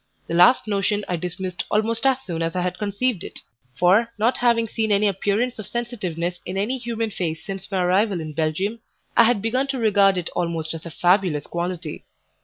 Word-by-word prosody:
The - - -5
last 180 +8 +5
notion 205 0 0
I 180 - -1
dismissed 180 +1 -4
almost 225 +4 +1
as 265 -2 +3
soon 165 -3 -3
as 165 +1 -1
I 180 - 0
had 180 0 -2
conceived 210 0 0
it, - - -8 0.3
for 195 - +3
not 230 +4 +2
having 235 -2 +3
seen 220 0 -1
any 205 +1 +4
appearance 205 +5 0
of 215 - -6
sensitiveness 180 -8 -3
in 185 +2 -5
any 235 +7 -1
human 230 -2 -3
face 160 -4 -3
since 195 -1 -6
my 190 -2 0
arrival 190 +1 +2
in 155 -1 -6
Belgium, 165 +9 -1 0.4
I 235 - +7
had 225 -3 +2
begun 255 +5 +1
to 270 -1 -2
regard 200 -4 +4
it 175 - -3
almost 165 -2 -2
as 165 +1 -7
a - - -6
fabulous 175 -3 +2
quality. 175 -2 -4
195 Hz, 200 wpm, -23 LUFS, 175-225 Hz, 0.4 s, I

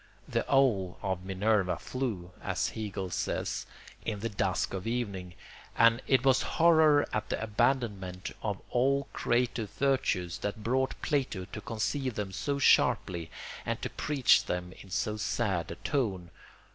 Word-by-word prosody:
The - - -1
owl 115 -10 +3
of 95 -2 -2
Minerva 95 0 +1
flew, 110 -10 -4
as - - -1
Hegel 100 -4 -4
says, 95 - -2 0.4
in 105 -3 -3
the 115 - -1
dusk 95 -2 -1
of 95 +2 -4
evening; 100 -7 -3 0.4
and 115 +2 +5
it 130 -1 +3
was 130 -1 +5
horror 160 -3 +5
at 110 0 -2
the - - -1
abandonment 105 -5 0
of 100 -3 -2
all 135 +3 +2
creative 120 -3 0
virtues 125 -11 0
that 105 +1 -4
brought 130 +3 0
Plato 130 - 0
to 105 +3 -8
conceive 125 +3 -2
them 100 -2 -3
so 140 +8 -2
sharply 85 - +3 0.3
and - - -2
to - - -2
preach 140 -4 +3
them 90 0 -3
in 95 - -13
so 105 +3 -1
sad 100 -5 -1
a 85 - -5
tone. 95 - -2
110 Hz, 145 wpm, -30 LUFS, 95-130 Hz, 0.4 s, and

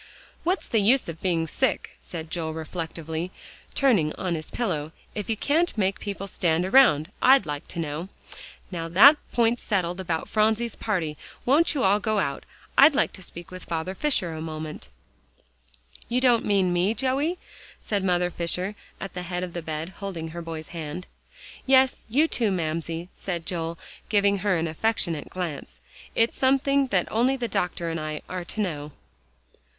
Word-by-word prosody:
"What's 360 +4 0
the 225 - +2
use 240 +6 +4
of 165 -1 -7
being 170 -3 +1
sick," 260 +9 -1
said 160 -2 -7
Joel 160 -2 -2
reflectively, 160 +1 -4 0.5
turning 205 - +3
on 185 -2 -2
his 155 -2 -4
pillow, 160 -10 -2 0.2
"if 210 -1 -5
you 220 - 0
can't 315 +4 +1
make 195 -1 +1
people 200 -1 -4
stand 175 -3 +1
around, 190 - +5
I'd 265 -3 +6
like 145 -1 -5
to - - -8
know. 160 +3 -3 0.6
Now 165 -2 -3
that 225 - +8
point's 235 0 +2
settled 180 -3 -1
about 165 -3 -2
Phronsie's 220 +2 +1
party, 170 -9 -2 0.3
won't 300 +5 +4
you 275 - +1
all 200 +2 +4
go 215 +1 0
out? 140 -8 -1 0.3
I'd 285 +1 +8
like - - +2
to 190 - -9
speak 175 -1 -6
to 185 - -7
Father 165 +1 -3
Fisher 195 - 0
a 160 - -5
moment." 155 - -6 1.2
"You 245 +1 +2
don't 245 -3 +4
mean 195 -3 +3
me, 185 +5 +2
Joey?" 275 +7 0 0.4
said 205 -3 -2
Mother 180 -1 +2
Fisher 180 +4 -2 0.3
at 195 - -6
the 180 - -4
head 180 0 -3
of 180 -2 -5
the 175 - -3
bed, 160 +1 -4
holding 180 -5 -5
her 170 +1 -6
boy's 160 -1 -6
hand. 165 +1 -6 0.6
"Yes; 265 -1 +4
you, 290 +8 +4
too, 230 -8 +1
Mamsie," 165 0 -2
said 170 -4 -4
Joel, 165 0 -3 0.3
giving 200 -1 +3
her 185 -1 +2
an 165 0 0
affectionate 165 -2 -1
glance, 150 - -5 0.4
"it's 230 +1 +2
something 275 +1 +3
that 195 -7 +1
only 245 +4 +3
the 245 -2 -2
doctor 175 -4 -1
and 165 - -2
I 155 -1 -4
are 185 -1 -4
to 215 - -3
know." 150 -6 -3
185 Hz, 170 wpm, -26 LUFS, 165-225 Hz, 1.2 s, that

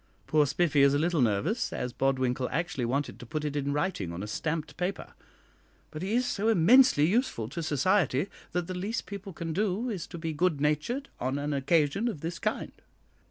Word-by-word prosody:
Poor 150 -1 +3
Spiffy 150 -1 +2
is 140 0 +5
a - - +3
little 165 0 +1
nervous, 125 - +1
as 125 - -3
Bodwinkle 130 -1 0
actually 155 -4 -2
wanted 140 +4 -2
to - - -9
put 150 +4 -3
it 145 -1 -3
in 140 -1 -1
writing 145 - -1
on 85 +3 -5
a - - -5
stamped 160 +7 -3
paper; 180 +2 -4 0.8
but 155 0 -6
he 195 +5 -1
is 250 +1 +2
so 215 -3 -1
immensely 220 - +6
useful 190 - 0
to 170 +5 -4
society, 155 -1 +2 0.3
that 180 -1 -1
the 185 - -5
least 200 +6 -3
people 200 0 -7
can 165 -1 -5
do 210 +6 0
is 190 -6 -4
to - - -8
be 160 -1 -3
good 165 -1 +1
natured 155 - 0
on 130 +2 -1
an 145 +1 -2
occasion 150 - +2
of 195 -12 -4
this 170 +1 -4
kind." 215 0 -2
160 Hz, 200 wpm, -29 LUFS, 140-190 Hz, 0.8 s, immensely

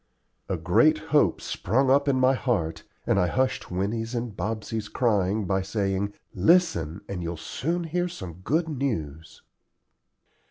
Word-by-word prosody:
A 95 - 0
great 90 - +4 0.2
hope 145 - +4
sprung 130 +7 +1
up 140 +1 +4
in 135 -2 +2
my 130 +1 +5
heart, 105 -12 -1 0.2
and - - +2
I 90 - +3
hushed 130 +6 0
Winnie's 110 +6 -2
and 115 -3 -3
Bobsey's 110 +2 -3
crying 105 -3 +1
by 95 0 +1
saying, 100 0 -1 0.2
"Listen, 105 - +2
and 95 -3 -4
you'll 85 0 -4
soon 165 - -2
hear 175 +2 -1
some 95 - -8
good 160 - +1
news." 85 - -4
110 Hz, 145 wpm, -26 LUFS, 95-135 Hz, 0.2 s, my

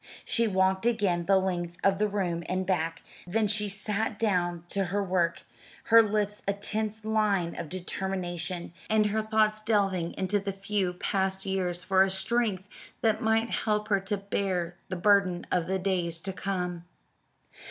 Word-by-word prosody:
She 230 -1 +1
walked 190 +1 +2
again 195 -7 +1
the 195 0 +5
length 175 -2 -2
of 195 -1 +3
the 210 - +3
room 185 -5 -1
and 185 +1 0
back; 165 -3 -1 0.2
then 215 +4 +1
she 210 0 0
sat 210 +2 -2
down 175 -6 0
to 195 -1 0
her 200 +3 -1
work, 180 -3 0 0.4
her 230 0 +7
lips 210 -1 -1
a 200 - +2
tense 215 +2 -3
line 210 -6 +1
of 160 - -5
determination, 180 -1 -4 0.2
and 215 -1 +4
her 210 +1 +1
thoughts 215 0 +2
delving 195 -6 +1
into 195 +2 0
the 200 0 -4
few 195 -1 -1
past 190 +1 -1
years 180 -2 -1
for 190 0 +3
a 195 - +5
strength 195 0 0 0.4
that 220 0 +2
might 225 0 +2
help 210 0 0
her 200 -2 +3
to 195 +2 -2
bear 190 -3 -2
the 185 - -2
burden 185 -1 +3
of 175 -2 +1
the 190 +1 0
days 180 -3 -1
to 190 +1 -4
come. 180 -3 -3
195 Hz, 165 wpm, -28 LUFS, 180-210 Hz, 0.4 s, her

